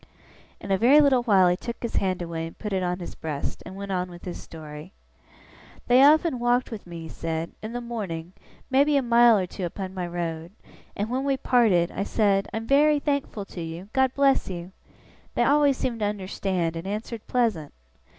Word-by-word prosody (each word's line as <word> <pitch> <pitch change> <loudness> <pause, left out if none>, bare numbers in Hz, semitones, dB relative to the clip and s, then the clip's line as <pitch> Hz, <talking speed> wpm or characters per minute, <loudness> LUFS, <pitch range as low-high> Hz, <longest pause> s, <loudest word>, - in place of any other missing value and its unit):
In - - -6
a 190 - +2
very 265 +6 +6
little 275 -4 +4
while 200 -6 +4
he 175 - +3
took 235 +5 -6
his 235 - -2
hand 185 -2 0
away 165 -1 -4
and 165 - -13
put 210 -2 -5
it 190 - 0
on 180 0 -1
his 175 - -7
breast, 150 -3 -5
and 190 - -9
went 200 0 -6
on 180 -1 -1
with 175 -1 -12
his 180 - -6
story. 155 +2 -10 0.9
'They 250 +2 +6
often 305 -1 +5
walked 245 +1 +1
with 215 -5 -8
me,' 170 -1 -8
he - - -7
said, 165 +1 -4
'in 220 +2 -6
the 245 - -3
morning, 190 -8 -5 0.4
maybe 280 +2 +4
a 275 - +1
mile 235 -1 +6
or 190 - 0
two 185 +2 -7
upon 185 +2 -5
my 180 -2 -3
road; 170 0 -4 0.4
and 210 +3 -3
when 260 +2 -1
we 275 -1 +1
parted, 215 -10 +3
and - - -7
I - - +1
said, 200 -2 +1
"I'm 225 0 -4
very 295 +3 +4
thankful 280 -8 -2
to 180 - -8
you! 165 +4 -7
God 265 -1 +3
bless 275 -5 +3
you!" 175 0 -6 0.6
they - - +3
always 285 -2 +4
seemed 235 -3 -2
to 210 - 0
understand, 190 -4 -2
and 165 +3 -5
answered 215 +2 -5
pleasant. 220 - 0
200 Hz, 210 wpm, -25 LUFS, 175-245 Hz, 0.9 s, very